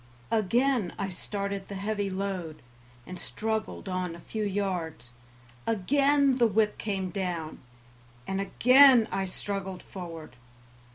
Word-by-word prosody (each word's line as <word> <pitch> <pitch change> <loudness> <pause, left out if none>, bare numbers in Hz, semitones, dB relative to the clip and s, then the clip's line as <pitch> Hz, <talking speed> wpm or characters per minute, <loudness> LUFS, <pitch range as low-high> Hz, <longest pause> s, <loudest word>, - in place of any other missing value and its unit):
Again 230 0 +2
I 195 - -2
started 200 +1 -4
the 200 - -6
heavy 205 0 -2
load, 185 -6 -4 0.4
and 180 -1 -7
struggled 220 +2 -3
on 185 -2 -2
a - - -11
few 215 +5 -4
yards; 180 - -2 0.6
again 275 +5 +3
the 235 - +6
whip 215 0 +1
came 195 -3 -2
down, 175 -4 -3 0.7
and 195 0 -2
again 250 +3 +6
I 195 0 -1
struggled 190 0 -4
forward. 165 -8 -9
195 Hz, 120 wpm, -28 LUFS, 185-220 Hz, 0.7 s, the